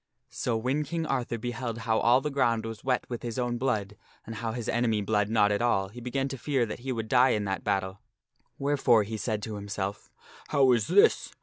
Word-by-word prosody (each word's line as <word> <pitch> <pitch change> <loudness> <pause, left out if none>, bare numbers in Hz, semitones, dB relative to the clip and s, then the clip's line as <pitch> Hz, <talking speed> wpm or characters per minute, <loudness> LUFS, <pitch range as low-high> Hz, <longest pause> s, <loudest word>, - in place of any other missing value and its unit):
So 120 -2 -1
when 130 +6 0
King 165 +1 -3
Arthur 125 -5 -1
beheld 120 0 -4
how 110 -1 +2
all 120 +3 +4
the 150 - -3
ground 115 -5 +1
was 115 -1 -7
wet 130 -1 0
with 120 -2 -5
his 120 -1 -5
own 120 -1 -1
blood, 105 -6 -1 0.3
and 115 - -7
how 115 +1 -3
his 120 -2 -5
enemy 115 -3 +1
bled 105 0 +1
not 105 -2 +3
at 105 - 0
all, 95 -5 +1
he 120 +4 -10
began 135 +3 -2
to 135 -1 -6
fear 135 -4 +1
that 105 - -6
he 130 +2 -4
would 115 -3 -3
die 125 +2 +4
in 105 - -2
that 95 -1 -3
battle; 95 -1 -1 0.6
wherefore 135 -5 +3
he 110 +2 -5
said 110 -1 -2
to 110 -2 -5
himself, 100 0 -5 0.4
"How 135 -2 +4
is 115 -4 +2
this? 195 +3 +4
115 Hz, 220 wpm, -28 LUFS, 105-130 Hz, 0.6 s, all